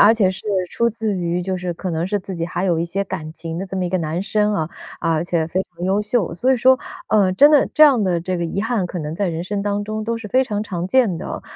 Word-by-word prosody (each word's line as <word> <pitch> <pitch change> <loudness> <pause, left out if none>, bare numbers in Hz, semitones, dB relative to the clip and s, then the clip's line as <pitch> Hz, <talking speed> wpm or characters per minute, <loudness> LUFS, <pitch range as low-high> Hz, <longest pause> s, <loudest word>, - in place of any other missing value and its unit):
而 215 +2 +7
且 200 -5 +3
是 190 - -9 0.2
出 235 - +1
自 220 -2 -2
于 175 -1 -1
就 185 +1 -2
是 180 -1 -3
可 185 +2 -4
能 165 +1 -1
是 205 +1 0
自 190 0 -7
己 165 0 -2
还 180 +2 -3
有 175 -4 +2
一 165 - 0
些 195 +4 -2
感 155 -4 -5
情 165 0 -6
的 195 - -4
这 190 - -5
么 185 - -1
一 - - -1
个 185 - +1
男 165 +3 -2
生 210 0 +1
啊， 160 -4 -2 0.3
而 165 -1 +1
且 170 -2 0
非 185 +3 -1
常 175 -1 -9
优 195 +2 +2
秀， 210 -4 0
所 245 +10 +1
以 260 - +2
说， 260 +2 +5 0.3
呃， 200 -3 +4
真 285 +10 +6
的 295 -2 +5
这 310 - +6
样 265 -7 +5
的 180 -3 +1
这 185 +1 -2
个 170 - -1
遗 195 +5 -2
憾 225 -5 0
可 175 - -5
能 150 0 -4
在 200 +3 -1
人 165 0 -3
生 200 +1 -2
当 205 0 -1
中 215 +1 -4
都 230 +1 -1
是 230 -1 -7
非 260 +5 +3
常 210 -5 -2
常 180 -4 -4
见 210 -7 +2
的。 - - -6
190 Hz, 310 characters per minute, -20 LUFS, 170-215 Hz, 0.3 s, 而